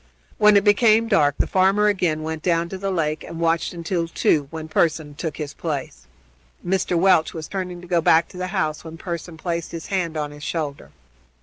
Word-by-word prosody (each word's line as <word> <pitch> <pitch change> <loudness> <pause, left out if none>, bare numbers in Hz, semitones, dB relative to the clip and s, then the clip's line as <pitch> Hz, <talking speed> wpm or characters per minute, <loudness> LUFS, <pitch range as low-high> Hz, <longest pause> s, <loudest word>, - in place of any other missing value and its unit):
When 210 -1 +7
it 200 - +3
became 220 +2 +4
dark 150 - +3
the - - +2
farmer 195 +2 +3
again 180 -7 +1
went 160 0 -4
down 170 -1 +1
to 190 - -5
the 195 0 -2
lake 155 -4 -1
and 165 - -8
watched 165 0 +1
until 170 0 -2
two, 150 -3 +1
when 160 0 -7
Pearson 155 -2 0
took 155 0 -5
his 150 -2 -5
place. 135 - -5 0.6
Mr. 180 -1 0
Welch 175 -3 +3
was 160 -1 -5
turning 180 -2 -5
to 180 - -12
go 170 -1 +2
back 165 +1 +4
to - - -12
the 185 0 -3
house 155 -6 -2
when 165 0 -9
Pearson 170 -1 -6
placed 170 0 -3
his 165 -1 -6
hand 170 -4 -1
on 150 -1 -3
his 145 0 -12
shoulder. 150 -4 -4
170 Hz, 205 wpm, -22 LUFS, 155-185 Hz, 0.6 s, When